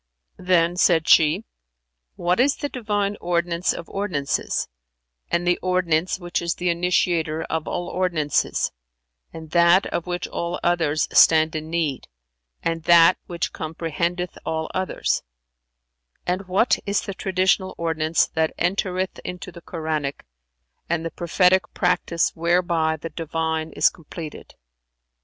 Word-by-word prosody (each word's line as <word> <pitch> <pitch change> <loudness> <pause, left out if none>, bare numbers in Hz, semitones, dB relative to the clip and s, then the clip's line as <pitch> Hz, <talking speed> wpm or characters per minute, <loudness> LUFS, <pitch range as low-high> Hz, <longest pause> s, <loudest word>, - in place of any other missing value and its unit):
'" - - -52
Then 180 -1 +2
said 170 -3 +3
she, 160 +7 +5 0.7
"What 175 +3 0
is 275 +3 +4
the 290 - -4
Divine 205 -5 -2
ordinance 170 0 0
of 170 - -6
ordinances 175 -9 -2 0.6
and 170 +1 0
the 175 0 +2
ordinance 180 -2 +1
which 175 -1 -3
is 170 0 -1
the 180 -1 0
initiator 170 -2 0
of 160 -1 -2
all 175 0 -3
ordinances 170 -5 0 0.6
and 160 -1 -10
that 170 +2 +5
of 170 - -3
which 175 0 -3
all 170 0 -3
others 165 -3 +1
stand 160 0 +5
in 155 0 -4
need 160 -5 -2 0.6
and 165 0 -1
that 170 +1 +6
which 170 -2 -3
comprehendeth 170 +2 -3
all 160 0 -3
others; 185 0 -1 1.0
and 185 +2 -2
what 195 +6 +2
is 200 0 +1
the 200 - -6
traditional 190 0 0
ordinance 160 -1 +1
that 160 -1 -1
entereth 185 +1 -1
into 180 0 -7
the 170 - -12
Koranic, 155 - -4 0.6
and 165 0 -1
the 165 - -3
prophetic 180 +2 +2
practice 175 -2 +1
whereby 170 -1 +1
the 165 +1 -7
Divine 160 0 -2
is - - +4
completed?" 160 -1 -10
170 Hz, 135 wpm, -23 LUFS, 160-180 Hz, 1.0 s, that